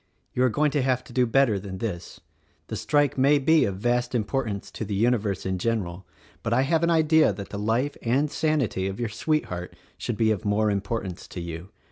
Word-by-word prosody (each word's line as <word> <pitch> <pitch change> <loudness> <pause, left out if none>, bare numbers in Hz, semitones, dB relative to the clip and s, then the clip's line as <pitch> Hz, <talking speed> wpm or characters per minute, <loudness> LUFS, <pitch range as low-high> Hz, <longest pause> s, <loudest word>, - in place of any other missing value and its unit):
you 125 - +1
are 130 - +4
going 150 +5 +1
to 145 - +1
have 130 -1 +1
to - - -14
do 125 -1 +3
better 115 -4 +3
than 95 -1 -7
this. 90 -4 -5 0.5
The - - -3
strike 145 -2 +1
may 140 +3 +5
be 155 +3 +4
of 100 - -2
vast 120 +3 0
importance 110 -3 -2
to - - -5
the 100 -1 -3
universe 110 -3 +1
in 95 -1 -1
general, 95 -5 -2 0.3
but 115 - -1
I 130 +3 +3
have 160 +3 +2
an 170 - +2
idea 160 -4 +4
that 100 0 -7
the 100 - -5
life 115 +7 0
and 135 +5 +1
sanity 140 -12 0
of 95 +3 -5
your 120 -2 -1
sweetheart 110 - -2 0.2
should 120 - -3
be 110 -1 +3
of 105 -4 -2
more 105 +1 +2
importance 100 -2 -3
to - - -7
you. 85 +1 -6
115 Hz, 210 wpm, -25 LUFS, 100-135 Hz, 0.5 s, may